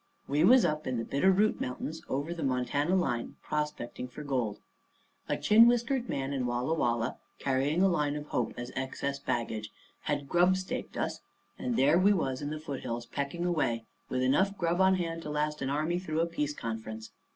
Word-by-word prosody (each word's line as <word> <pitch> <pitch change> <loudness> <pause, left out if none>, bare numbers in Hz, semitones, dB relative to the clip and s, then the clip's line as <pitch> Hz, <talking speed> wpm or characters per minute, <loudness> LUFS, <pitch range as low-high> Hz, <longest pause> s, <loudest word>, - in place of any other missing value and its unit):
We 145 +3 +2
was 250 +6 +7
up 155 0 -1
in 130 -1 -1
the 115 - -2
Bitter 165 +8 +3
Root 210 +3 +2
Mountains 150 +5 -4
over 145 +5 -1
the 170 - -6
Montana 135 +6 +1
line 130 -10 -1
prospecting 150 -5 -3
for 140 +4 -9
gold. 125 -7 -1 0.7
A - - +1
chin 225 +2 +7
whiskered 240 +1 +1
man 135 +1 -2
in 130 -3 -1
Walla 120 +5 0
Walla, 120 -5 0 0.2
carrying 140 +6 +1
a - - +6
line 150 -5 +1
of 150 0 -5
hope 125 - -1
as 120 +1 -5
excess 140 +1 -3
baggage, 110 -4 -2 0.4
had 145 -2 -1
grubstaked 185 +4 +1
us; - - -2 0.4
and 250 -2 -1
there 150 +2 +5
we 200 +3 +5
was 135 -8 -1
in 145 - -3
the 155 0 -4
foothills 130 -6 -4
pecking 140 +7 -3
away, 120 -10 0 0.2
with 130 0 0
enough 190 +10 +2
grub 170 +1 +1
on 190 0 +5
hand 165 -2 -2
to 150 - -6
last 150 0 -1
an 135 - -1
army 155 +5 0
through 160 -3 -1
a - - +3
peace 150 -3 -2
conference. 110 -1 -5
150 Hz, 190 wpm, -30 LUFS, 130-175 Hz, 0.7 s, was